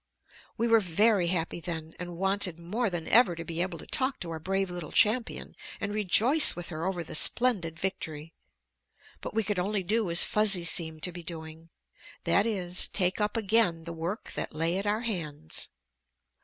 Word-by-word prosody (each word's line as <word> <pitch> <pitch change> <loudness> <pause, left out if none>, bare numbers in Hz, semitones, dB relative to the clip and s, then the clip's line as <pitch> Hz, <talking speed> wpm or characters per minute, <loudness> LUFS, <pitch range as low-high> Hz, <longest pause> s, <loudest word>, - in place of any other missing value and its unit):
We 230 - 0
were 225 -1 +5
very 200 0 +2
happy, 175 -1 -2
then, 160 -2 -6
and 175 -1 -7
wanted 195 -2 0
more 205 +7 -2
than 175 -3 -5
ever 225 -6 +4
to 165 0 -7
be 165 +1 -3
able 180 -1 -3
to - - -11
talk 260 0 0
to 170 - -4
our 160 - -5
brave 195 +2 -2
little 175 -3 -7
champion 225 +2 +1 0.2
and 200 +1 -4
rejoice 220 - +5
with 175 0 -7
her 160 +2 -4
over 180 -3 -3
the 160 - -9
splendid 175 -2 +3
victory. 160 -3 -5 0.9
But - - -8
we 225 - +1
could 205 -2 -2
only 195 +2 -1
do 215 +1 0
as 170 +1 +5
Fuzzy 210 -4 +4
seemed 160 -2 +1
to 180 - -1
be 175 0 -8
doing. 160 -1 -9 0.5
That 195 +5 +2
is, 185 -5 -1
take 185 +1 -1
up 210 +2 -1
again 210 -6 +2
the 170 +1 -7
work 170 +7 -5
that - - -5
lay 165 +4 0
at 200 - -4
our 210 +2 0
hands. 155 - -4
180 Hz, 185 wpm, -28 LUFS, 165-210 Hz, 0.9 s, were